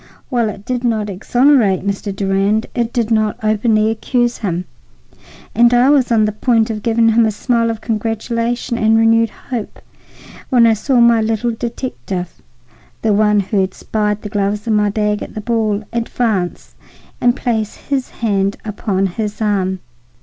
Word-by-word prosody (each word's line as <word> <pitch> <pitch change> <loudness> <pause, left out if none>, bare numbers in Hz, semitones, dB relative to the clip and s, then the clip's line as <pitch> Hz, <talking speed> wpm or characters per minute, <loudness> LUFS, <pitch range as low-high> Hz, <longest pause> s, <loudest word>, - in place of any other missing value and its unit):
While 235 -4 +1
it 205 -1 -9
did 250 -1 -2
not 215 -4 0
exonerate 225 -1 +2
Mr. 200 +1 -2
Durand, 195 +3 +1
it 235 -1 -1
did 235 -3 -1
not 215 -1 +1
openly 215 0 +2
accuse 240 +2 -1
him, 180 -4 -2 0.9
and 240 0 +5
I 250 +3 +5
was 265 -5 +2
on 220 -2 +4
the 210 - 0
point 225 +1 +1
of 215 -1 -5
giving 230 +1 +2
him 225 +1 +4
a 220 - +3
smile 230 +2 0
of 225 -1 -4
congratulation 230 +2 -2
and 220 +1 +3
renewed 225 0 +4
hope 235 -2 -7 0.7
when 245 -3 +5
I 225 - +5
saw 245 +4 +1
my 235 -1 +5
little 225 +2 0
detective—the 180 - -6
one 210 0 +3
who 195 +1 0
had 190 0 -2
spied 210 -1 -2
the 210 - -5
gloves 205 0 -1
in 225 - 0
my 210 0 +2
bag 210 0 -1
at - - -8
the 215 - -4
ball—advance 220 -2 -2 0.5
and 245 0 +3
place 220 -5 -2
his 275 -3 -3
hand 200 -3 -1
upon 200 -2 -1
his 210 +2 -4
arm. 190 -3 0
220 Hz, 160 wpm, -17 LUFS, 205-235 Hz, 0.9 s, and